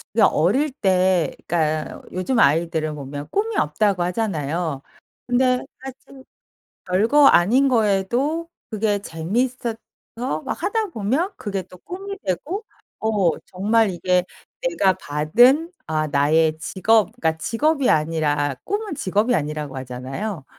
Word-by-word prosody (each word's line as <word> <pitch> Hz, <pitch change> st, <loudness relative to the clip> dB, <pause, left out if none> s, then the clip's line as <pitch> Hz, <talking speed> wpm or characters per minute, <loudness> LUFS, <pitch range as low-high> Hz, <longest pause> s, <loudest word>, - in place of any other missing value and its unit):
그 230 Hz, -, +3 dB
어릴 255 Hz, -, +3 dB
때 185 Hz, -, +1 dB
그러니까 155 Hz, -2 st, -1 dB
요즘 185 Hz, +8 st, -1 dB
아이들을 155 Hz, 0 st, +2 dB
보면 145 Hz, 0 st, -7 dB
꿈이 435 Hz, +2 st, -1 dB
없다고 180 Hz, +4 st, +1 dB
하잖아요. 165 Hz, -6 st, -2 dB, 0.4 s
근데 250 Hz, 0 st, +2 dB, 0.2 s
사실 265 Hz, 0 st, -11 dB, 0.6 s
별거 225 Hz, +11 st, +4 dB
아닌 255 Hz, +8 st, +5 dB
거에도 240 Hz, +9 st, +1 dB, 0.2 s
그게 210 Hz, -2 st, 0 dB
재미있어서 225 Hz, +8 st, -2 dB, 0.7 s
막 -, -, -4 dB
하다 435 Hz, +3 st, 0 dB
보면 275 Hz, -, -1 dB
그게 195 Hz, -3 st, -4 dB
또 180 Hz, -, -16 dB
꿈이 390 Hz, -, -7 dB
되고 300 Hz, -, -3 dB, 0.4 s
어 205 Hz, -7 st, +1 dB
정말 210 Hz, +3 st, +1 dB
이게 180 Hz, 0 st, +1 dB, 0.4 s
내가 195 Hz, -, +2 dB
받은 240 Hz, -, +3 dB
아 155 Hz, -1 st, 0 dB
나의 155 Hz, +3 st, +2 dB
직업 190 Hz, +5 st, +2 dB
그러니까 160 Hz, -9 st, 0 dB
직업이 280 Hz, -, +1 dB
아니라 150 Hz, -2 st, +1 dB
꿈은 410 Hz, -3 st, -3 dB
직업이 210 Hz, +1 st, +1 dB
아니라고 150 Hz, -, -3 dB
하잖아요. 130 Hz, -, -5 dB
195 Hz, 270 characters per minute, -22 LUFS, 160-255 Hz, 0.7 s, 아닌